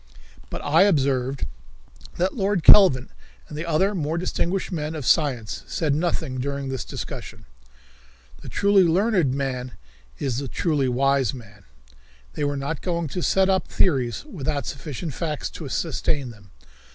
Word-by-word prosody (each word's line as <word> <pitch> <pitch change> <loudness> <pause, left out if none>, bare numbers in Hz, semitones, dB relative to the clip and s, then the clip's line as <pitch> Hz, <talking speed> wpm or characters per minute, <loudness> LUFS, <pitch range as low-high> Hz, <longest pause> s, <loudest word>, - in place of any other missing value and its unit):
But - - -6
I 155 +4 +4
observed 140 -8 +2 0.7
that 185 +2 +1
Lord 195 -5 0
Kelvin 135 -11 +7 0.4
and 150 - -9
the 155 +3 -4
other 185 +6 +2
more 160 -3 -2
distinguished 185 +2 -1
men 155 -2 -3
of 150 -5 -5
science 125 - +1
said 155 -4 0
nothing 155 -4 -1
during 140 +1 -3
this 130 -6 -3
discussion. - - -7 1.0
The - - -9
truly 200 -1 +4
learned 180 - +2
man 130 -2 -3 0.4
is 130 -3 -2
the 140 - -4
truly 145 0 0
wise 135 0 +2
man. 105 -5 -14 0.7
They - - -3
were 145 0 0
not 140 +3 -3
going 170 -3 -2
to 180 - -4
set 190 +2 +3
up 190 -1 +1
theories 125 - +1
without 145 - -3
sufficient 145 +2 -5
facts 155 -2 -3
to 150 -5 -7
sustain 145 -4 -1
them. 100 -3 -17
150 Hz, 150 wpm, -24 LUFS, 130-170 Hz, 1.0 s, Kelvin